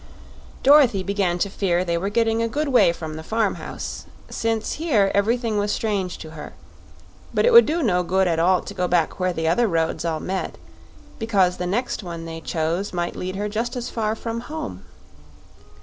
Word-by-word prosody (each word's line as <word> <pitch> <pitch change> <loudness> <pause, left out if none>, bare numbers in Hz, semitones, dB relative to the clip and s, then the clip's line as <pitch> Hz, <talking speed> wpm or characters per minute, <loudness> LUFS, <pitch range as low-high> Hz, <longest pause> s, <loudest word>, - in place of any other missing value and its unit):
Dorothy 270 -9 +6
began 195 -3 0
to 190 - 0
fear 180 -3 0
they 170 -1 0
were 185 +4 -1
getting 225 +1 +1
a 230 - +1
good 295 +5 -2
way 245 -9 +5
from 160 -2 -6
the 160 - -7
farm 220 +2 0
house, - - -6 0.2
since 225 -1 -1
here 220 -12 +3
everything 225 +1 +1
was 205 0 0
strange 200 -5 -1
to 155 - -10
her; 155 -1 -9 0.8
but - - +3
it - - +4
would 470 - +9
do 325 +2 0
no 180 -7 +2
good 190 +2 +1
at 165 -2 +1
all 180 +2 +3
to - - -8
go 180 - -1
back 175 -1 +1
where 185 0 +1
the 160 -2 -2
other 230 +9 +3
roads 165 -3 0
all 165 -2 -1
met, 190 0 -4 0.6
because 195 -6 +2
the 180 - -3
next 235 +7 -1
one 170 -3 -7
they 165 0 -7
chose 165 +5 -2
might 175 -1 -2
lead 185 +1 -4
her 205 +2 -2
just 225 +4 -3
as 245 -1 -4
far 220 -1 -1
from 230 0 -4
home. 240 - -6
195 Hz, 195 wpm, -23 LUFS, 175-225 Hz, 0.8 s, would